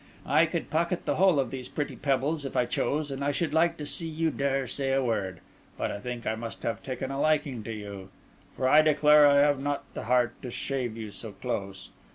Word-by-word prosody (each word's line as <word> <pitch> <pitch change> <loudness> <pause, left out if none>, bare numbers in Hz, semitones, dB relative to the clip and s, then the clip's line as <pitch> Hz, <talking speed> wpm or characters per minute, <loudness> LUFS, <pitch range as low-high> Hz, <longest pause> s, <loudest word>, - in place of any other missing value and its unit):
I - - +4
could - - -4
pocket 170 +2 0
the - - 0
whole 185 -6 +5
of 130 -4 -1
these 130 -2 -6
pretty 145 - -3
pebbles, 145 +2 0
if 135 - -4
I 125 - +3
chose, 145 +4 -1
and 135 +1 -4
I 145 - +1
should 150 +3 -1
like 170 +1 +3
to 150 - -5
see 165 +3 -2
you 160 0 0
dare 135 -1 0
to - - -7
say 135 +2 -1
a 135 0 +2
word; 100 -7 -2 0.4
but - - -1
I 100 - -5
think 120 +1 -6
I 110 - 0
must 115 +1 -7
have 115 - -2
taken 130 0 -4
a 135 +1 -2
liking 145 -6 +1
to 115 - -4
you; 100 -3 -7 0.5
for 130 - 0
I 150 +4 +7
declare 150 -1 +6
I 140 0 +5
have 145 -1 +3
not 145 +1 -2
the - - -6
heart 125 -1 +2
to 125 - -6
shave 120 -2 -3
you 110 -2 -6
so 105 +2 -8
close. 100 -3 -5
135 Hz, 235 wpm, -28 LUFS, 115-150 Hz, 0.5 s, I